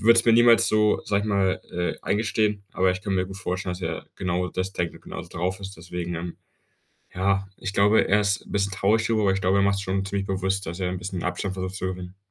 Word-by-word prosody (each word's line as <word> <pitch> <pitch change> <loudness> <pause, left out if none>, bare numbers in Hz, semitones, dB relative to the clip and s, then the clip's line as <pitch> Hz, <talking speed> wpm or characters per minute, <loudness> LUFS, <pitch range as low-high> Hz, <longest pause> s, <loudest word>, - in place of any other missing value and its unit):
würde 115 +1 +7
es - - +4
mir 115 - +7
niemals 120 0 +6
so, 105 0 +3
sage 100 0 +1
ich 110 - -3
mal, 95 -2 +1
äh, 90 0 -2
eingestehen, 105 -1 0
aber 95 0 +3
ich 90 - -2
kann 100 -1 -2
mir 95 -1 +1
gut 95 0 -8
vorstellen, 90 -3 -3
dass 90 - -9
er 80 -1 -3
genau 90 0 -1
das 95 +1 -3
denkt 85 -1 -1
und - - -13
genauso - - -8
drauf 90 +3 -2
ist, 100 0 -7
deswegen, 90 0 -5
ähm 85 +1 -5 0.8
ja, 95 +1 +1
ich 95 - -4
glaube, 105 +2 +4
er 105 +1 +5
ist 100 -1 +1
bisschen - - -19
'n - - -11
bisschen 100 -1 +1
traurig 105 +3 +2
darüber, 110 -2 +2
weil 95 - +4
ich 95 - -2
glaube, 95 +2 +3
er - - +4
macht 100 0 +3
sich 100 - -3
schon 95 +1 0
ziemlich 100 0 -2
bewusst, 95 0 -1
dass 85 +3 -5
er 90 -1 0
'n 90 - -3
bisschen 90 0 -4
Abstand 95 +2 -2
versucht 95 0 -4
zu 95 - -3
gewinnen. 90 0 -7
95 Hz, 265 wpm, -25 LUFS, 90-100 Hz, 0.8 s, würde